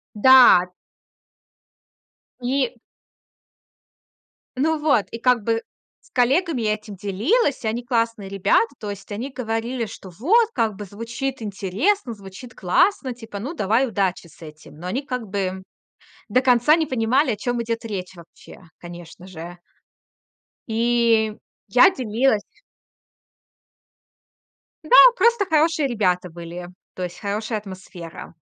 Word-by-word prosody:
Да. 245 Hz, -6 st, +7 dB, 1.7 s
И 255 Hz, -1 st, -1 dB, 1.8 s
Ну 315 Hz, +4 st, +1 dB
вот, 280 Hz, -9 st, +2 dB
и, 230 Hz, -, -6 dB
как 250 Hz, -3 st, +2 dB
бы, 230 Hz, +1 st, 0 dB, 0.4 s
с -, -, -25 dB
коллегами 275 Hz, +3 st, +1 dB
я 215 Hz, 0 st, +2 dB
этим 210 Hz, -1 st, -8 dB
делилась, 225 Hz, -, 0 dB
они 230 Hz, +2 st, -2 dB
классные 230 Hz, -4 st, -1 dB
ребята. 210 Hz, +5 st, +1 dB
То 210 Hz, -, -6 dB
есть 200 Hz, 0 st, -8 dB
они 245 Hz, +7 st, -5 dB
говорили, 235 Hz, -1 st, -3 dB
что 200 Hz, -2 st, -11 dB
вот, 380 Hz, -, +2 dB
как 220 Hz, -3 st, 0 dB
бы, 205 Hz, +1 st, -8 dB
звучит 230 Hz, +6 st, -5 dB
интересно, 220 Hz, -, -1 dB
звучит 200 Hz, +4 st, -12 dB
классно, 260 Hz, -, +1 dB
типа, 225 Hz, -4 st, -9 dB
ну, 265 Hz, +10 st, -5 dB
давай 230 Hz, -, +1 dB
удачи 190 Hz, -5 st, -2 dB
с 170 Hz, -, -21 dB
этим. 155 Hz, -1 st, -13 dB
Но 180 Hz, -, -7 dB
они 255 Hz, +10 st, -2 dB
как 250 Hz, -5 st, -4 dB
бы 190 Hz, -1 st, -3 dB, 0.7 s
до 255 Hz, -, +3 dB
конца 255 Hz, +4 st, +4 dB
не 320 Hz, -2 st, 0 dB
понимали, 255 Hz, +3 st, +1 dB
о -, -, -3 dB
чём 240 Hz, +2 st, -2 dB
идет 230 Hz, 0 st, -4 dB
речь 190 Hz, -4 st, -5 dB
вообще, 170 Hz, +1 st, -15 dB, 0.2 s
конечно 175 Hz, +1 st, -11 dB
же. 175 Hz, -1 st, -9 dB, 1.1 s
И 230 Hz, -1 st, +2 dB, 0.4 s
я -, -, +7 dB
делилась 235 Hz, -, 0 dB, 2.4 s
Да, -, -, -12 dB, 0.3 s
просто 470 Hz, -4 st, +3 dB
хорошие 315 Hz, -2 st, +2 dB
ребята 180 Hz, -6 st, 0 dB
были, 175 Hz, +1 st, -9 dB, 0.2 s
то 185 Hz, -, -6 dB
есть 175 Hz, -1 st, -6 dB
хорошая 215 Hz, +2 st, -3 dB
атмосфера. 185 Hz, -5 st, -10 dB
225 Hz, 125 wpm, -22 LUFS, 195-255 Hz, 2.4 s, Да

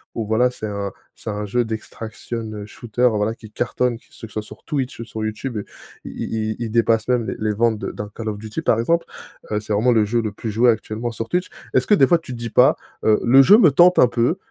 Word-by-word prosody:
où 115 Hz, -, -2 dB
voilà 110 Hz, +4 st, +2 dB
c'est 115 Hz, -, -7 dB
un 100 Hz, -1 st, -4 dB, 0.2 s
c'est -, -, -8 dB
un 105 Hz, 0 st, -3 dB
jeu 120 Hz, +4 st, +1 dB
d' 115 Hz, -, -9 dB
extraction 110 Hz, 0 st, -6 dB
shooter 120 Hz, +3 st, -1 dB
voilà, 105 Hz, +1 st, 0 dB
qui 110 Hz, -2 st, -14 dB
cartonne. 120 Hz, +1 st, -1 dB
Que -, -, -29 dB
ce 115 Hz, -, -11 dB
soit 110 Hz, 0 st, -4 dB
sur 105 Hz, -, -13 dB
Twitch 135 Hz, -6 st, -3 dB
ou -, -, -6 dB
sur 110 Hz, -1 st, -6 dB
YouTube 110 Hz, +3 st, -4 dB, 0.5 s
i -, -, -8 dB
i 110 Hz, -1 st, -3 dB
i -, -, -4 dB
il 115 Hz, -1 st, -3 dB
dépasse 115 Hz, -1 st, +2 dB
même 125 Hz, -2 st, +1 dB
les -, -, -3 dB
les 110 Hz, 0 st, 0 dB
ventes 115 Hz, +1 st, +1 dB
de -, -, -4 dB
d'un 105 Hz, 0 st, -7 dB
Call 115 Hz, -, -6 dB
of 105 Hz, -, -4 dB
Duty, 110 Hz, +8 st, -5 dB
par 115 Hz, -7 st, +2 dB
exemple. 165 Hz, +9 st, +1 dB, 0.5 s
Heu, 105 Hz, -, +1 dB
c'est 105 Hz, -, -8 dB
vraiment 110 Hz, +5 st, +3 dB
le 110 Hz, -2 st, +4 dB
jeu 115 Hz, +3 st, 0 dB
le 110 Hz, -2 st, -3 dB
plus 110 Hz, -, -5 dB
joué 115 Hz, +4 st, +4 dB
actuellement 110 Hz, +2 st, -4 dB
sur 115 Hz, 0 st, -6 dB
Twitch. 180 Hz, +1 st, 0 dB, 0.3 s
Est-ce -, -, +3 dB
que -, -, +4 dB
des 135 Hz, -10 st, +5 dB
fois, 175 Hz, -, +4 dB
tu 160 Hz, -6 st, -9 dB
te -, -, -7 dB
dis 115 Hz, 0 st, -5 dB
pas, -, -, +5 dB, 0.3 s
heu: 110 Hz, -1 st, +4 dB
«Le 130 Hz, +3 st, +7 dB
jeu 200 Hz, +9 st, +8 dB
me 175 Hz, -, +7 dB
tente 175 Hz, +6 st, +5 dB
un -, -, +7 dB
peu, 120 Hz, +8 st, 0 dB
115 Hz, 260 wpm, -21 LUFS, 110-125 Hz, 0.5 s, jeu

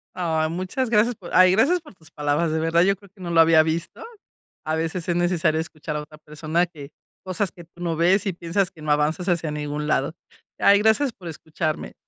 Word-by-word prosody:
Ay, 160 Hz, -3 st, 0 dB
muchas 185 Hz, +9 st, -3 dB
gracias 230 Hz, +2 st, +3 dB
por 185 Hz, -5 st, -11 dB
ay, 185 Hz, 0 st, +7 dB
gracias 275 Hz, -, +3 dB
por 310 Hz, -, -15 dB
tus 165 Hz, -3 st, -18 dB
palabras, 150 Hz, +2 st, 0 dB
de 160 Hz, -, 0 dB
verdad 165 Hz, +1 st, +2 dB
yo 195 Hz, +2 st, +3 dB
creo 200 Hz, 0 st, -19 dB
que 190 Hz, 0 st, -19 dB
no 175 Hz, -, -5 dB
lo 165 Hz, -, +3 dB
había 160 Hz, -1 st, +6 dB
visto. 160 Hz, +1 st, -3 dB, 0.6 s
A 155 Hz, 0 st, -1 dB
veces 165 Hz, +2 st, -3 dB
es 175 Hz, -, +1 dB
necesario 170 Hz, -3 st, +1 dB
escuchar 155 Hz, -1 st, -6 dB
a 150 Hz, -, -3 dB
otra 150 Hz, +1 st, -15 dB
persona 155 Hz, +3 st, -1 dB
que 150 Hz, -5 st, -12 dB, 0.3 s
cosas 185 Hz, +1 st, -1 dB
que 175 Hz, -, -13 dB
tú 170 Hz, +1 st, -14 dB
no 165 Hz, -2 st, -1 dB
ves 180 Hz, +5 st, +3 dB
y 195 Hz, -, 0 dB
piensas 175 Hz, +3 st, -1 dB
que 155 Hz, -, -15 dB
no 150 Hz, -, -3 dB
avanzas 155 Hz, +5 st, 0 dB
hacia 170 Hz, -3 st, 0 dB
ningún 150 Hz, 0 st, -4 dB
lado. 145 Hz, 0 st, 0 dB, 0.4 s
Ay 200 Hz, 0 st, +5 dB
gracias 220 Hz, +5 st, +2 dB
por 180 Hz, -5 st, -10 dB
escucharme. 155 Hz, 0 st, -4 dB
170 Hz, 220 wpm, -23 LUFS, 155-185 Hz, 0.6 s, ay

